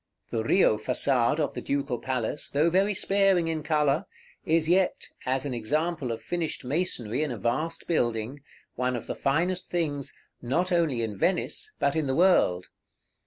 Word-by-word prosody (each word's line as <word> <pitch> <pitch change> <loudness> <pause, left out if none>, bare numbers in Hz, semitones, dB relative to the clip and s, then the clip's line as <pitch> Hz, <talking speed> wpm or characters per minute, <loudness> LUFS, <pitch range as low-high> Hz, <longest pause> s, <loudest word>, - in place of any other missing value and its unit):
The 115 -1 -1
Rio 115 - +3
Façade 125 +3 +1
of 150 - 0
the - - -5
Ducal 140 -3 -2
Palace, 130 +1 -2
though 155 +4 +2
very 195 +3 +2
sparing 195 -3 +3
in 160 -1 -2
color, 150 -2 +1 0.4
is 160 0 +2
yet, 180 +2 +1 0.2
as 130 +1 0
an 140 - -2
example 150 +4 -1
of 115 - -5
finished 170 -6 -3
masonry 130 - -1
in 155 - 0
a 120 - -4
vast 135 +10 -2
building, 120 -3 -1 0.3
one 125 0 -1
of 115 - -5
the - - -3
finest 175 +6 0
things, 150 -6 -2 0.2
not 170 +10 0
only 160 -9 +1
in 105 -3 -4
Venice, 425 - 0
but 140 - +1
in 155 -3 0
the 130 - 0
world. 150 - +3
145 Hz, 165 wpm, -27 LUFS, 125-170 Hz, 0.4 s, Rio